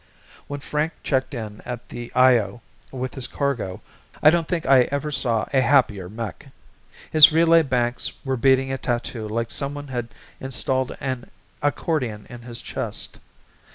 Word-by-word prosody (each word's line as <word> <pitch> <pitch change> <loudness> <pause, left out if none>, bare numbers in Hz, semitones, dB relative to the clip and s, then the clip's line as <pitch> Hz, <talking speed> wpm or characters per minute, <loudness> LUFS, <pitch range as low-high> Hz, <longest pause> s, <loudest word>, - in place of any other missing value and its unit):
When 145 0 -5
Frank 150 +3 -1
checked 130 0 0
in 105 -3 -6
at 125 -1 -7
the 120 -1 -7
Io 120 -4 +4 0.3
with 130 -1 -5
his 130 -2 -1
cargo 130 -10 -2 0.4
I 155 - +9
don't 170 -1 +1
think 170 -3 -2
I 130 -2 +6
ever 140 +2 -2
saw 120 -5 0
a 135 - +4
happier 115 -9 +2
mech. 110 -1 -6 0.6
His 155 -1 +9
relay 165 +1 +5
banks 125 -4 -1
were 135 -1 0
beating 135 +1 +3
a 135 - -2
tattoo 120 -2 -3
like 115 +1 -2
someone 145 0 -3
had 120 -3 -3 0.3
installed 130 0 -1
an 130 -3 -4 0.3
accordion 140 -7 -1
in 120 -1 -9
his 120 0 -7
chest. - - -5
130 Hz, 155 wpm, -23 LUFS, 120-140 Hz, 0.6 s, I